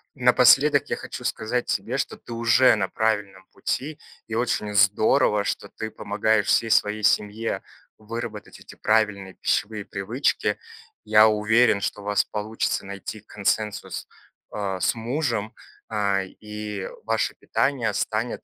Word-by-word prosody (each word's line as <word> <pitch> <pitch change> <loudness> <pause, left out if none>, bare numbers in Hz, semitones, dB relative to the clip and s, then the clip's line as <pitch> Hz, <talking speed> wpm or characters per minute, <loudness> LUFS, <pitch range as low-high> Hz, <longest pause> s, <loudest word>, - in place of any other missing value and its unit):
Напоследок - - +5
я - - 0
хочу - - -8
сказать 120 +3 -2
тебе, - - -1
что - - -3
ты 115 - -10
уже 115 +2 +5
на 95 -3 -1
правильном 105 -4 -1
пути, 150 +3 -3 0.3
и 115 - -7
очень 105 -3 -1
здорово, 105 +2 +3
что 100 0 -3
ты 110 0 -6
помогаешь 105 +1 0
всей 115 -1 +2
своей 105 +1 +2
семье 105 +2 +1 0.4
выработать 110 -1 -7
вот - - -17
эти - - -12
правильные 105 -3 0
пищевые 105 -1 -1
привычки. 110 +8 -1 0.5
Я 110 0 +6
уверен, 110 +1 +3
что 105 - -3
у 100 - -12
вас 105 -2 +2
получится 105 -1 -2
найти 100 +2 -7
консенсус, 105 0 -2 0.4
а, 95 -3 -3
с - - +1
мужем. 115 -2 -2 0.4
А, 100 -2 +1
и 105 0 -7 0.2
ваше 115 0 0
питание 135 -4 0
станет 110 +2 -2
105 Hz, 135 wpm, -24 LUFS, 105-115 Hz, 0.5 s, Я